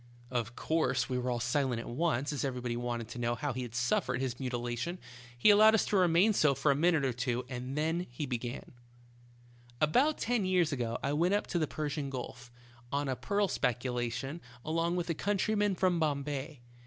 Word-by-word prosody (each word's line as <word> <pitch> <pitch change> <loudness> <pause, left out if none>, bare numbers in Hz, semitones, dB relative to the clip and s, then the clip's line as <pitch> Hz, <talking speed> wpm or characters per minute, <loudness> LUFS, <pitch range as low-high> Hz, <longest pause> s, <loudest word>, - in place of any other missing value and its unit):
Of 120 -2 -2
course 155 -6 0
we 125 -1 0
were 125 0 -2
all 120 -1 0
silent 120 0 0
at - - -7
once, 145 +1 0
as 145 - -2
every 130 -2 -2
body 120 -1 -3
wanted 120 -1 -3
to 120 - -7
know 120 0 0
how 145 +2 -2
he 130 - -4
had 120 -2 -6
suffered 125 +1 +1
his 130 -2 -3
mutilation. 120 +6 -3 0.4
He 120 - +6
allowed 215 +2 +7
us 220 - +2
to - - -1
remain 185 +3 +4
so 150 -7 +3
for 140 +2 +2
a - - +2
minute 160 -1 +3
or 130 - 0
two, 125 0 -2
and 130 +2 -5
then 165 +3 0 0.2
began: 120 0 -4 1.1
"About 255 - +3
ten 240 -3 0
years 185 -4 +2
ago 120 -4 -2
I 140 - 0
went 175 +6 +2
up 205 - 0
to 175 - -1
the 155 - +1
Persian 150 -2 -3
Gulf, 125 -2 -7 0.4
on 140 0 -1
a 130 - 0
pearl 200 +8 0
speculation, 125 +2 -2 0.2
along 165 +2 0
with 175 -1 -1
a - - +1
coun 200 +6 -1
tryman 205 0 +1
from 180 -3 +2
Bombay. 145 -2 -2
140 Hz, 200 wpm, -31 LUFS, 125-170 Hz, 1.1 s, allowed